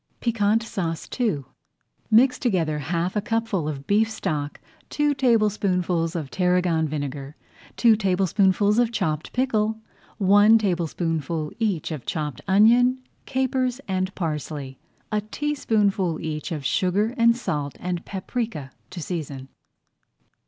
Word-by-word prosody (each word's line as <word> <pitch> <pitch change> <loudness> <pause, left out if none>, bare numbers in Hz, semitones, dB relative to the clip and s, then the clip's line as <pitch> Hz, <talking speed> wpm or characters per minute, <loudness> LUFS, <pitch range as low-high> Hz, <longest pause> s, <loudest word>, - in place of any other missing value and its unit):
PIQUANT 225 -1 +1
SAUCE 170 -7 -4
II 200 - +1 0.7
Mix 245 +4 +5
together 165 -10 0
half 170 +6 -2
a 210 - +1
cupful 225 -7 -1
of 140 -2 -6
beef 215 +2 +2
stock, 150 -9 -3 0.3
two 295 0 +1
tablespoonfuls 195 -9 +1
of 155 -5 -4
tarragon 180 -3 +1
vinegar, 145 -1 -5 0.4
two 230 -2 +5
tablespoonfuls 195 +1 +2
of 240 -1 +2
chopped 160 -8 -2
pickle, 220 -4 0 0.4
one 205 +2 +6
tablespoonful 165 -5 -1
each 200 -9 -1
of 150 -6 -6
chopped 150 -5 -3
onion, 235 +6 +5 0.3
capers, 260 -1 0
and 185 0 -2
parsley, 150 -5 -4 0.3
a 210 -1 +1
teaspoonful 210 - 0
each 155 -1 -4
of 150 -4 -4
sugar 195 - +1
and 235 -2 +4
salt, 145 - -3
and 180 -1 -3
paprika 195 - -4 0.2
to 180 -3 -6
season. 140 -6 -5
190 Hz, 120 wpm, -24 LUFS, 160-220 Hz, 0.7 s, one